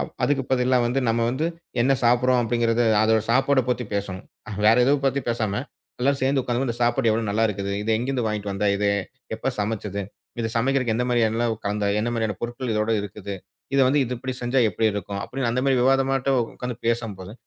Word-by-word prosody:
அ - - +1 0.2
அதுக்கு 140 -2 +2
பதிலா 130 0 +3
வந்து 125 +3 0
நம்ம 115 +1 +1
வந்து 140 +6 -1 0.3
என்ன 130 +3 +4
சாப்பிடுறோம் 125 +1 +3
அப்டிங்கிறது 120 0 +1 0.2
அதோட 110 0 +3
சாப்பாடப் 130 +1 +2
பத்தி 125 0 -1
பேசணும். 100 -2 -3 0.4
வேற 110 +1 +6
எதுவும் 140 +1 +2
பத்தி 135 +1 +1
பேசாம 110 -4 -1 0.5
எல்லாரும் 140 +2 +1
சேர்ந்து 135 +1 +2
உக்காந்துனு 125 +2 -1
இந்த 120 - -3
சாப்பாடு 120 +1 +2
எவ்வளவு 110 0 0
நல்லா 110 +2 +1
இருக்குது, 100 -1 -3
இத 110 - -2
எங்கிருந்து 125 +1 -1
வாங்கிட்டு 105 -2 -2
வந்தா 100 +1 -1
இது, 100 0 +1 0.5
எப்ப - - -2
சமைச்சது, 105 -1 -2 0.4
இத 115 -1 -2
சமைக்கறதுக்கு 130 -1 +1
எந்த 125 - 0
மாதிரியான 120 -3 +2
என்னல 115 +2 0 0.2
கலந்த, 105 0 -1
என்ன 115 - -1
மாதிரியான 110 -4 -1
பொருட்கள் 120 +1 -4
இதோட 105 +1 0
இருக்குது, 100 0 -6 0.4
இத 140 - +4
வந்து 145 +3 +2 0.2
இப்படி 130 +2 -4
செஞ்சா 125 +2 0
எப்படி 110 +4 +1
இருக்கும் 100 0 -4
அப்டின்னு 130 -2 -2
அந்த 125 +2 0
மாதிரி 135 -1 +3
விவாதமாட்டம் 135 0 +2 0.2
உக்காந்து 125 -1 -5
பேசும்போது 110 -5 -2
120 Hz, 190 wpm, -24 LUFS, 105-130 Hz, 0.5 s, வேற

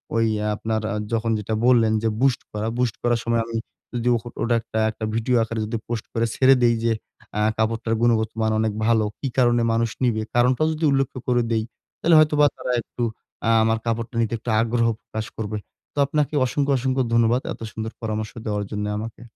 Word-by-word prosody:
ওই 115 0 +3 0.3
আপনার 110 0 -2
আ - - -2 0.2
যখন 115 0 +1
যেটা 105 +1 -3
বললেন 115 -3 +5
যে 115 - +2
boost 135 -3 +3
করা, 105 +1 -3
boost 125 -3 0
করার 120 -1 +2
সময় 115 0 +2
আমি 115 -1 -4 0.4
যদি 120 0 -1
অ - - +2 0.3
ওটা 120 0 +2 0.4
একটা 110 0 -5
ভিডিও 115 +2 +1
আকারে 115 0 -4
যদি 115 +2 -3
পোস্ট 115 -2 -3
করে 115 0 +1
ছেড়ে 135 0 +6
দেই 120 -1 +5
যে 115 - +2 0.5
আ - - +1 0.2
কাপড়টার 115 0 0
গুণগত 115 -2 +3
মান 110 0 +2
অনেক 110 -1 +1
ভালো। 115 -1 +3 0.2
কি 140 - -2
কারণে 120 -1 +4
মানুষ 115 0 +1
নিবে, 115 -3 +2
কারণটাও 125 +5 +3
যদি 155 +1 -6
উল্লেখ্য 135 -2 0
করে 120 -1 +3
দেই, 110 -1 +1 0.4
তাহলে 165 0 +4
হয়তোবা 150 -1 +5
তারা 125 - -3
একটু 120 - -6 0.4
আ - - +3
আমার 110 0 +2
কাপড়টা 115 +1 -2
নিতে 115 0 -1
একটু 115 - -7
আগ্রহ 115 0 +1
প্রকাশ 110 0 -5
করবে। 110 -1 -3 0.4
তো - - -26
আপনাকে 150 +1 0
অসংখ্য, 140 +2 0
অসংখ্য 130 +1 0
ধন্যবাদ 115 +2 +3
এত - - -14
সুন্দর 110 0 -5
পরামর্শ 110 -1 -3
দেওয়ার 105 -1 -1
জন্য 105 0 -2
আমাকে। 115 +1 -7
115 Hz, 195 wpm, -23 LUFS, 110-125 Hz, 0.5 s, ছেড়ে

